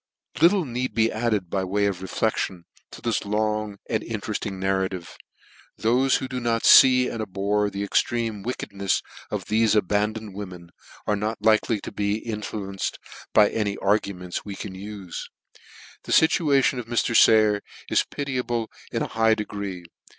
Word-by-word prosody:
Little 180 +1 +5
need 125 -3 -3
be 115 0 +3
added, 110 -6 -1
by 95 - 0
way 100 +2 0
of 95 -3 -1
reflection, 95 -2 -2 0.2
to - - -12
this 115 -3 0
long 105 0 -1
and 110 -1 0
interefting 105 -3 -4
narrative. 95 -2 -2 0.6
Thofe 125 +4 +3
who 130 - -4
do 130 -1 -4
nor 115 -1 0
fee 125 -1 +7
and 115 - -4
abhor 105 +1 0
the 100 0 -4
extreme 115 +1 0
wickednefs 100 -5 -2 0.3
of - - -4
thefe 110 0 +2
abandoned 105 +1 0
women; 90 -4 -8 0.3
are 105 - +1
not 105 +1 -3
likely 110 0 +3
to - - -7
be 100 0 -1
in 110 -1 -5
fluenced 100 -2 -4 0.3
by 105 -1 +5
any 105 -2 -1
arguments 100 -3 -1
we 100 -2 -7
can 100 -1 -7
ufe. 100 -1 -7 0.8
The - - -6
fituation 145 -5 +3
of 120 - -7
Mr. 120 0 0
Sayer 110 -2 +5 0.3
is - - +3
pitiable 125 -5 -2 0.2
in - - -1
a - - -2
high 115 0 +4
degree. 100 -4 -5
105 Hz, 155 wpm, -24 LUFS, 100-115 Hz, 0.8 s, fee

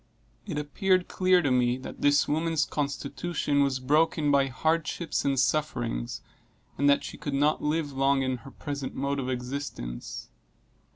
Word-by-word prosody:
It - - -3
appeared 185 +5 +1
clear 185 -1 +3
to 140 - +1
me 125 -1 +2
that 130 - -9
this 145 +1 +4
woman's 160 0 +1
constitution 145 +1 -1
was 135 -2 +1
broken 150 +2 +2
by 140 -1 +4
hardships 160 +4 -1
and 135 -2 +2
sufferings, 120 - -1 0.5
and 145 +1 +3
that 140 - +4
she - - -8
could 145 -2 -3
not 145 +2 +2
live 150 -1 0
long 135 0 +2
in 130 -1 -1
her 120 +3 -12
present 140 0 -5
mode 140 +1 -1
of 130 -1 -3
existence. 125 - -5
140 Hz, 155 wpm, -28 LUFS, 130-155 Hz, 0.5 s, this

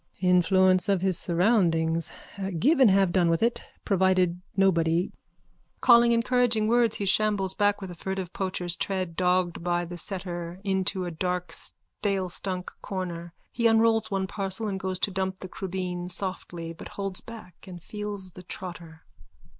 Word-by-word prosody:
_ - - +2
Influence 185 +2 +4
of 190 -2 +2
his 190 -3 0
surroundings. 170 -4 +1 0.5
Give 280 - +3
and 255 -5 +7
have 195 -2 +3
done 175 -2 +3
with 165 +5 +1
it. 235 +1 +1 0.2
Provided 185 -3 +2 0.2
nobody. 175 -1 +2 0.7
_(Calling 235 -1 +6
encouraging 235 -2 +2
words 235 -1 +3
he 200 - -3
shambles 195 -1 +2
back 205 0 +2
with 190 -2 -6
a - - -9
furtive 190 0 -4
poacher's 180 -2 0
tread, 185 -4 -3
dogged 180 -1 +1
by 175 0 0
the 175 +1 -7
setter 175 -1 -2
into 190 -1 0
a 175 - -4
dark 180 +1 -2
stalestunk 185 -1 -3
corner. 175 -3 -5 0.2
He 235 -1 +2
unrolls 225 -1 +3
one 195 -2 -1
parcel 195 +2 -2
and 195 -2 -3
goes 185 -1 -1
to 200 - 0
dump 190 0 -2
the 185 - -8
crubeen 180 -1 -4
softly 175 -3 -3
but 165 - -10
holds 195 -2 -2
back 215 -7 -12
and 175 -2 -10
feels 205 -3 -5
the 180 - -11
trotter.) 170 -3 -9
185 Hz, 155 wpm, -27 LUFS, 175-200 Hz, 0.7 s, and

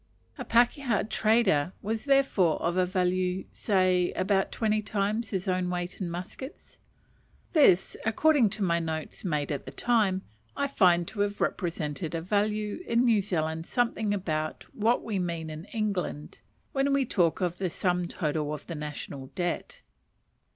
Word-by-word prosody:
A - - -3
pakeha 240 0 +2
trader 215 -8 +2
was 220 +3 -2
therefore 270 - +3
of 170 +1 0
a 185 -1 +2
value 185 0 0
say 185 -3 +2
about 195 +1 +1
twenty 215 -1 +1
times 215 +2 -1
his 190 -2 -3
own 185 -1 0
weight 180 +2 -4
in 180 - -2
muskets. 180 - -8 0.7
This, 235 - +5
according 255 +1 +4
to 210 - -1
my 170 -2 +2
notes 160 -1 -4
made 150 -6 -1
at 145 - -4
the - - -5
time, 210 -6 +1 0.3
I 280 - +1
find 180 -10 +3
to 210 - -9
have 205 0 0
represented 165 -2 -2
a 165 - -2
value 210 - 0
in 235 +2 +3
New 225 -4 +4
Zealand 160 -4 -2
something 230 -4 0
about 155 -6 -2
what 225 +3 +1
we 210 -4 -2
mean 170 -3 -3
in 155 +3 -7
England 200 -9 -3 0.3
when 275 0 +1
we 275 -1 +2
talk 175 -8 +1
of 175 -1 -1
the 190 -2 0
sum 180 +1 0
total 150 -3 -2
of 145 - -11
the 170 - -6
national 145 -3 -6
debt. 175 -2 -3
185 Hz, 160 wpm, -28 LUFS, 170-215 Hz, 0.7 s, This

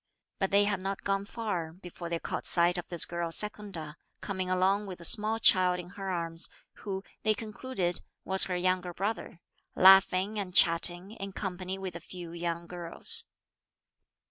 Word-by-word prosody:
But 195 - +1
they 200 +1 +5
had 205 -2 0
not 195 +1 -4
gone 195 0 0
far 200 -8 -4
before 175 -1 -9
they 170 - -1
caught - - -1
sight 175 +1 +3
of 175 - -8
this 175 -2 +5
girl 170 -1 -3
Secunda 195 -6 -3 0.2
coming 185 -2 -4
along 190 +3 +2
with 185 -2 -7
a 170 - -4
small 215 +5 +3
child 185 -4 +4
in 175 0 -8
her 195 0 -6
arms, 165 -2 -3 0.3
who, 195 -2 -5 0.2
they 215 0 +2
concluded, 210 -4 -3 0.2
was 190 0 +4
her 180 - -2
young 185 +1 +1
brother, 180 0 -4 0.3
laughing 190 +2 +6
and 180 -3 -5
chatting, 175 +3 +4
in 195 -3 -7
company 185 -1 -4
with 190 -2 -6
a - - -5
few 175 0 -9
young 170 0 -3
girls. 180 - -1
185 Hz, 170 wpm, -30 LUFS, 175-200 Hz, 0.3 s, laughing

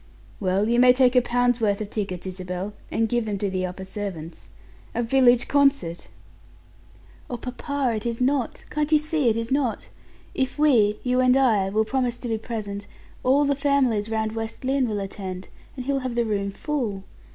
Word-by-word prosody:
"Well, 195 +2 +1
you 235 +1 +2
may 250 0 +7
take 255 -1 +3
a 250 - +7
pound's 245 0 +1
worth 205 -2 +2
of 210 -1 -5
tickets, 190 -4 -4
Isabel, 185 +1 -5 0.2
and 225 - +1
give 240 0 0
them 205 -1 -2
to 195 0 -2
the 185 -1 -1
upper 190 +1 -7
servants. 185 -5 -7 0.5
A 240 - +1
village 245 0 +4
concert!" 275 - +2 1.2
"Oh, 245 - -3
papa, 260 +1 -2
it 215 - -7
is 230 -1 -3
not 260 -1 0
can't 300 0 -1
you 310 - +7
see 305 -3 +1
it 225 - +1
is 230 +1 -3
not? 265 -5 0 0.4
If 265 +1 -1
we, 230 -9 +4
you 250 0 +1
and 255 0 +5
I, 220 -8 +3
will 215 +2 +1
promise 250 0 -1
to 245 - -6
be 225 -1 -1
present, 205 -3 -5 0.4
all 275 +3 +4
the 285 - +2
families 265 -7 +1
round 220 -1 -1
West 225 +3 -5
Lynne 265 -2 +1
will 210 -1 -2
attend, 190 -2 -6 0.3
and 255 -2 -6
he 280 - 0
will 275 - +1
have 255 -2 -4
the 235 -1 +1
room 200 -2 -1
full. 215 -4 -3
235 Hz, 195 wpm, -24 LUFS, 205-260 Hz, 1.2 s, may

